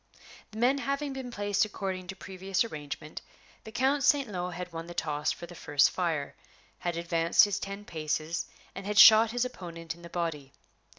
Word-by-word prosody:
The 215 - -11
men 255 +4 +3
having 280 0 -2
been 265 -2 -6
placed 205 -3 0
according 190 -3 -4
to 195 - -6
previous 190 0 -2
arrangement, 150 -6 -7 0.4
the 220 - -8
Count 270 +5 +1
St. 285 -2 +4
Lo 180 -3 -3
had 180 0 -7
won 165 0 -6
the 175 - -9
toss 150 -2 -1
for - - -6
the 175 - -12
first 145 -4 +3
fire, 165 -6 -2 0.5
had 175 -1 -2
advanced 170 +1 +4
his 205 -2 -2
ten 200 +1 -6
paces, 155 0 -2 0.3
and 195 +1 -7
had 210 0 -2
shot 220 +1 +9
his 245 +2 0
opponent 170 -8 -7
in 170 - -17
the 170 - -10
body. 165 -6 -3
185 Hz, 185 wpm, -29 LUFS, 165-220 Hz, 0.5 s, shot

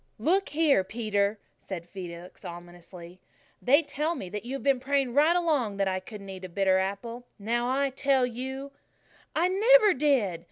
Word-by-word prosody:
"Look 365 - +1
here, 295 -8 +3
Peter," 205 0 -1 0.2
said 175 -3 -7
Felix 175 -1 -9
ominously, 175 +1 -11 0.4
"they 285 +6 +4
tell 305 +3 -2
me 190 - -6
that 210 +1 -5
you've 265 +3 -5
been 275 -2 +3
praying 270 -1 0
right 305 +5 +4
along 290 - +1
that 195 -1 +1
I 185 0 0
couldn't 200 +1 -10
eat 190 -1 -8
a 185 - -6
bitter 190 +1 +2
apple. 230 +6 -4
Now, 235 +4 -1
I 275 +1 +1
tell 270 -1 +2
you 265 +3 -6 0.3
" - - -31
"I 335 +3 +3
never 425 +2 +5
did!" 255 - +1
240 Hz, 170 wpm, -28 LUFS, 190-280 Hz, 0.4 s, never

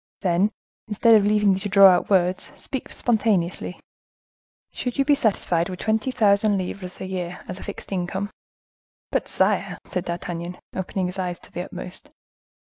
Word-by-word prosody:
"Then, 185 +3 +2 0.4
instead 225 +2 +4
of 210 -2 +6
leaving 210 -1 +4
you 190 - -1
to 205 - -4
draw 195 0 +7
out 180 -1 +2
words, 185 -2 +2
speak 265 - -5
spontaneously. 205 -7 0 0.9
Should 250 -1 -4
you 275 - +3
be 290 - +5
satisfied 195 -9 +1
with 185 - -5
twenty 220 +3 +1
thousand 205 -3 +3
livres 185 0 -5
a - - -4
year 180 -2 -5
as 185 +1 -6
a - - -9
fixed 205 - -8
income?" 190 +2 -2 0.8
"But, - - 0
sire" - - +1
said 180 0 -3
D'Artagnan, 175 0 -4 0.2
opening 190 0 -2
his 180 +1 -4
eyes 180 -2 -2
to - - -13
the 180 - -4
utmost. 180 - -9
190 Hz, 165 wpm, -24 LUFS, 180-210 Hz, 0.9 s, draw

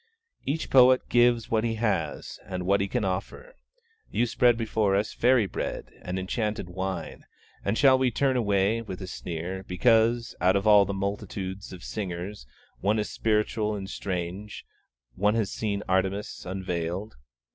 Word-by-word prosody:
Each 150 +4 -1
poet 130 -1 +6
gives 120 -2 +3
what 110 -1 +2
he 115 -1 0
has, 100 -9 -2
and 90 -1 -5
what 100 +1 +3
he 100 - 0
can 100 - -1
offer; 95 - -4 0.6
you 120 - +1
spread 120 0 +3
before 110 -3 +1
us 105 +2 0
fairy 125 -2 +4
bread, - - -4
and 90 +1 -4
enchanted 105 0 -2
wine, 95 -2 -4 0.4
and 100 +3 0
shall 130 -2 +6
we 130 -1 +3
turn 130 +2 +1
away, 105 -1 +2
with 95 -5 -7
a - - -4
sneer, 90 +1 -5
because, 115 +4 +3
out 95 +2 +4
of 100 +1 0
all 105 -2 +7
the 100 - -3
multitudes 100 -1 -4
of 90 -2 -10
singers, 95 - -5 0.3
one 105 +3 +1
is 105 - -2
spiritual 105 0 0
and 95 -1 -6
strange, 95 +2 -5 0.5
one 105 - +2
has 110 -4 0
seen 105 -2 -2
Artemis 95 +1 -1
unveiled? 90 +1 -3
100 Hz, 155 wpm, -27 LUFS, 95-115 Hz, 0.6 s, all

